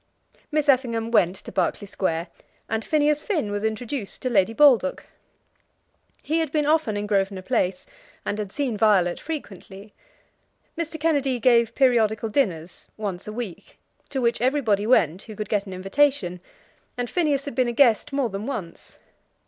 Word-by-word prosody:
Miss 300 -1 0
Effingham 235 -4 +2
went 185 -5 +3
to 195 - -9
Berkeley - - -1
Square, 170 -3 -2 0.4
and 225 0 -2
Phineas 300 -1 +2
Finn 310 - -1
was 205 0 -3
introduced 220 +1 -4
to 255 - -1
Lady 200 -1 +3
Baldock. 280 +1 +4 1.2
He 320 +2 0
had 320 -3 -1
been 300 -1 +1
often 300 -9 +1
in 205 - -2
Grosvenor 195 -2 0
Place, 185 -5 -1 0.4
and 205 - -2
had 205 -2 -4
seen 270 -3 -2
Violet 200 -5 +3
frequently. 205 - -8 0.8
Mr. 330 -1 -4
Kennedy 285 -5 +1
gave 235 -1 +3
periodical 225 -4 +2
dinners, 180 - -2
once 200 -4 -5
a - - -4
week, 215 -6 -7 0.3
to 275 - -2
which 235 -2 +1
everybody 235 -6 +1
went 185 - +3
who 215 - -10
could 210 0 -5
get 205 -1 0
an 190 - -7
invitation; 195 -1 +1 0.6
and 245 0 -2
Phineas 295 -3 0
had 285 - -5
been 255 -2 +1
a - - 0
guest 240 +2 +3
more 275 -3 0
than 195 +3 -5
once. 190 -11 -7
225 Hz, 160 wpm, -24 LUFS, 200-280 Hz, 1.2 s, Baldock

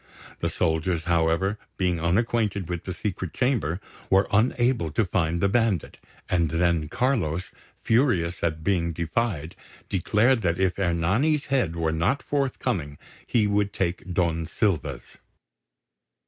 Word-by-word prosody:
The - - 0
soldiers, 80 +1 0
however, 85 +4 +1 0.2
being 90 -3 +1
unacquainted 100 +1 +1
with 85 -2 -4
the 95 - -3
secret 95 -4 -4
chamber, 120 - 0 0.3
were 95 +1 +4
unable 120 -2 +2
to 110 - +2
find 85 -3 0
the 100 - +4
bandit; 105 -5 0 0.3
and 85 -3 +1
then 80 -2 +1
Carlos, 90 - 0 0.3
furious 100 -8 +2
at 80 -2 -1
being 85 -3 +1
defied, 85 -1 -2 0.3
declared 110 +6 +2
that 85 -2 0
if 95 0 +1
Ernani's 95 - +1
head 95 -12 +1
were 80 -1 0
not 95 - 0
forthcoming 100 - -2 0.3
he 110 -3 +2
would 100 0 +1
take 90 0 -2
Don 85 -2 0
Silva's. 75 - -2
90 Hz, 130 wpm, -25 LUFS, 85-110 Hz, 0.3 s, were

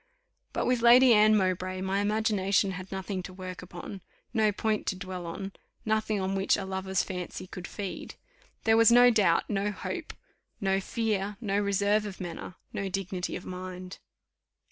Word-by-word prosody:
But - - -1
with 250 -1 +2
Lady 245 +1 +8
Anne 215 0 +6
Mowbray 185 -1 0
my 190 +1 0
imagination 205 -2 +1
had 185 0 -7
nothing 190 0 -3
to 185 - -8
work 185 -1 -7
upon, 180 +2 -8 0.3
no 220 -3 +3
point 215 +1 -1
to - - 0
dwell 185 -2 -6
on, 195 +4 -5 0.3
nothing 215 -1 +1
on 190 0 -1
which 195 0 +2
a 195 - -4
lover's 190 0 -1
fancy 180 -1 -5
could 180 -1 -8
feed: 200 -3 -6 0.5
there 225 0 +4
was 230 0 +7
no 245 +1 +8
doubt, 195 -7 +3
no 200 0 0
hope, - - -5 0.5
no 195 -1 +1
fear, 210 -2 -1
no 205 -3 0
reserve 205 +1 +2
of 195 - -8
manner, 180 0 -6 0.2
no 195 -1 -2
dignity 190 -1 -3
of - - -7
mind. 185 0 -7
195 Hz, 165 wpm, -29 LUFS, 185-210 Hz, 0.5 s, Lady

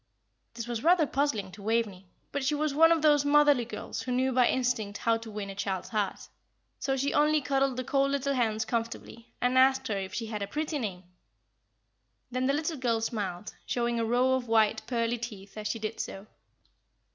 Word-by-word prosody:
This 230 -1 -5
was 235 0 -3
rather 340 -1 +5
puzzling 250 -10 -1
to 200 +3 -12
Waveney, 210 -3 -1 0.2
but 285 -1 -2
she 290 +3 +1
was 300 -1 0
one 325 +3 +6
of 325 -2 +2
those 295 -2 +5
motherly 290 -3 +4
girls 235 - -6
who 255 - -4
knew 260 +1 +1
by 250 -1 +4
instinct 240 -6 0
how 230 -1 +2
to 225 0 -10
win 205 -2 -5
a - - -7
child's 195 -2 -3
heart, 210 -4 -2 0.5
so 270 -1 -1
she 275 +2 0
only 300 +1 +4
cuddled 270 -1 0
the 255 - -2
cold 275 +1 +1
little 280 0 0
hands 220 -4 0
comfortably, 230 0 -4
and 250 +1 +3
asked 265 -1 +4
her 205 - 0
if 190 -1 -5
she 230 - -2
had 215 -2 -5
a 200 - -2
pretty 305 +2 -2
name. 190 -6 -4 1.3
Then 255 +1 0
the 275 - +2
little 310 +2 -1
girl 240 -3 +1
smiled, 210 -5 -4
showing 235 -1 -1
a - - +1
row 245 +3 +2
of 260 -2 -1
white, 220 -1 +3
pearly 235 -1 0
teeth 210 -4 -8
as 215 -1 -4
she 225 - -2
did 220 0 -5
so. 195 +1 -5
240 Hz, 205 wpm, -29 LUFS, 220-275 Hz, 1.3 s, one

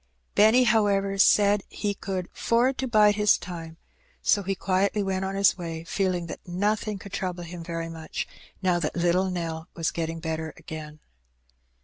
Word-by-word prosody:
Benny, 220 +5 +6
however, 200 -4 +2
said 205 +1 +5
that - - -17
he 205 -1 -2
could 190 -2 -4
"'ford 245 +3 +1
to 265 - -1
bide 210 -3 +5
his 210 -1 +4
time," 165 -2 -8 0.5
so 205 - +3
he 195 0 -2
quietly 195 +2 +1
went 190 -1 -1
on 190 0 -3
his 195 -1 +3
way, 165 -2 -5
feeling 180 0 -1
that 170 - -7
nothing 205 +3 -1
could 195 0 -11
trouble 180 -3 -3
him 170 0 -8
very 165 -1 -4
much 165 -1 -5 0.4
now 180 -2 +3
that 155 -2 -2
"little 175 +2 +2
Nell" 165 -2 -4
was 165 -1 0
getting 165 0 -3
better 160 -1 -4
again. 155 -1 -9
185 Hz, 170 wpm, -26 LUFS, 165-205 Hz, 0.5 s, Benny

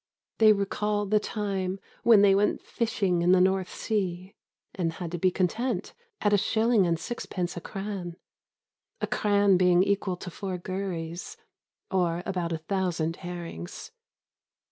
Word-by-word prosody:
They 220 -1 +8
recall 205 +1 0
the 210 +1 +3
time 195 -3 -3 0.2
when 225 -3 +6
they 200 -1 +6
went 200 +2 +1
fishing 195 -6 0
in 175 +1 +4
the 185 - +5
North 190 0 +2
Sea 190 -3 -2 0.4
and 170 -4 -1
had 170 -1 -6
to 175 - -3
be 185 - +4
content 200 +3 0
to - - -16
sell - - -17
their 470 -3 -38
catch - - -7
at 205 - +4
a - - +6
shilling 220 -2 +3
and 165 -1 0
sixpence 180 -3 -4
a 175 - -5
cran 195 -4 -5 0.8
a - - 0
cran 205 -2 +3
being 180 0 +5
equal 200 -2 0
to 180 - -8
four 190 +1 -4
gurries, 180 - -5 0.5
or 175 -2 +1
about 180 -3 -2
a 165 - 0
thousand 165 -1 -1
herrings. 170 - -7
190 Hz, 165 wpm, -27 LUFS, 175-205 Hz, 0.8 s, They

